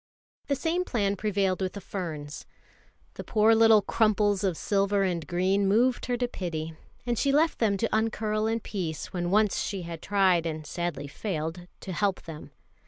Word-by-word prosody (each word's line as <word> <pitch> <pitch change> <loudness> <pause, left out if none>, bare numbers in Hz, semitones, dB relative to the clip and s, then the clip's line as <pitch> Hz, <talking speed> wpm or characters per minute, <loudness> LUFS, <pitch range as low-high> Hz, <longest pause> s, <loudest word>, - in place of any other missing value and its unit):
The 280 - +1
same 335 +5 0
plan 200 - 0
prevailed 195 -2 0
with 185 -1 -2
the 200 - -6
ferns. 160 -7 -6 0.7
The - - -7
poor 220 0 +4
little 225 -2 +6
crumples 210 -2 +2
of 185 -5 0
silver 200 0 +1
and 175 -4 -2
green 190 +3 +1
moved 240 +6 +2
her 245 -1 0
to 245 0 0
pity, 165 -7 -4 0.3
and 240 -2 -1
she 280 - +2
left 310 +3 +2
them 210 -4 +2
to 220 +2 0
uncurl 220 -1 0
in 225 +1 -1
peace 170 -8 -5
when 175 -1 -2
once 210 +1 +3
she 195 -3 -3
had 165 -1 -7
tried 185 -4 +2
and 155 -1 -5
sadly 170 -2 -3
failed 165 +1 -4
to 190 - -6
help 200 +1 0
them. 160 -2 -9
200 Hz, 175 wpm, -27 LUFS, 175-220 Hz, 0.7 s, little